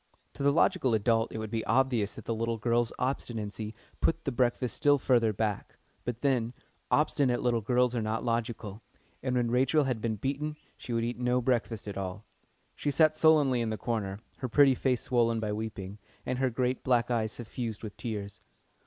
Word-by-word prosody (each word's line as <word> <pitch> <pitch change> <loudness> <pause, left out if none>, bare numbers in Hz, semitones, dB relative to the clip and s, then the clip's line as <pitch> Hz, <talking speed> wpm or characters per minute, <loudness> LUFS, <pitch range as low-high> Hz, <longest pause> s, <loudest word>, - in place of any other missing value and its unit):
To - - -9
the 140 0 +4
logical 130 -5 +3
adult 115 +1 +2
it - - -5
will 110 - -3
be 110 +1 -3
obvious 125 -6 +2
that - - -10
the 115 - -1
little 115 +1 -1
girl's 120 +1 +1
obstinacy 110 -4 -3 0.2
put 165 0 +1
the 140 - 0
breakfast 120 0 0
still 145 0 +4
further 120 -4 +3
back; 105 0 -3 0.3
but 120 -1 -4
then, 125 -4 +1 0.4
obstinate 140 -4 +2
little 120 -2 +2
girls 125 +2 +2
are 115 - 0
not 110 +2 -2
logical, 115 -3 -2 0.4
and 130 -1 -1
when 120 -1 +1
Rachel 135 +5 +3
had 130 -5 -2
been 110 -1 -1
beaten 140 +7 -2 0.2
she - - -9
would 115 -1 +1
eat 120 +1 -3
no 125 0 +2
breakfast 120 -4 -1
at 100 - -5
all. 95 +3 -5 0.5
She 145 - -2
sat 155 +1 +4
sullenly 150 -6 +4
in 115 - -1
the 110 - -2
corner, 105 -5 -2 0.2
her 130 - -4
pretty 140 +2 +6
face 125 -1 0
swollen 115 -2 +2
by 105 -1 -2
weeping, 105 -2 -5 0.3
and 130 - -2
her 130 -1 +2
great 125 +1 -1
black 120 -1 +2
eyes 110 -2 0
suffused 115 -1 -5
with 105 -2 -6
tears. 105 -4 -5
120 Hz, 190 wpm, -30 LUFS, 110-130 Hz, 0.5 s, pretty